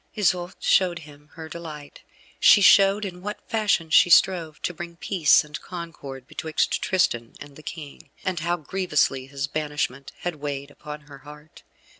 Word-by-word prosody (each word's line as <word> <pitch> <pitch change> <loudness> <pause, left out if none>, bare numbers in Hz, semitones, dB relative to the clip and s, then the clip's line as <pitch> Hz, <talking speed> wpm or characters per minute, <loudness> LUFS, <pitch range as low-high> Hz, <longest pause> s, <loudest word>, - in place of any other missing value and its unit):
Isoude 180 -4 0
showed 180 -2 +3
him 145 0 -16
her 160 -1 -9
delight. 155 -3 -9 0.4
She - - +7
showed 200 +1 +6
in 180 -2 -7
what 210 +2 -7
fashion 205 -7 0
she 175 - +6
strove 165 -3 +4
to 180 - -1
bring 170 0 -8
peace 170 -4 +3
and 150 0 -8
concord 155 -7 -8
betwixt 160 -1 -1
Tristan 120 -11 0
and 145 -1 -11
the 155 - -12
King, 155 -2 -9 0.2
and 185 -2 -1
how 170 +2 -1
grievously 150 -6 0
his 140 0 -3
banishment 145 -3 -3
had 175 -3 -3
weighed 140 -1 -5
upon 150 +1 -9
her 145 -2 -14
heart. 150 +2 -14
155 Hz, 160 wpm, -24 LUFS, 145-180 Hz, 0.4 s, She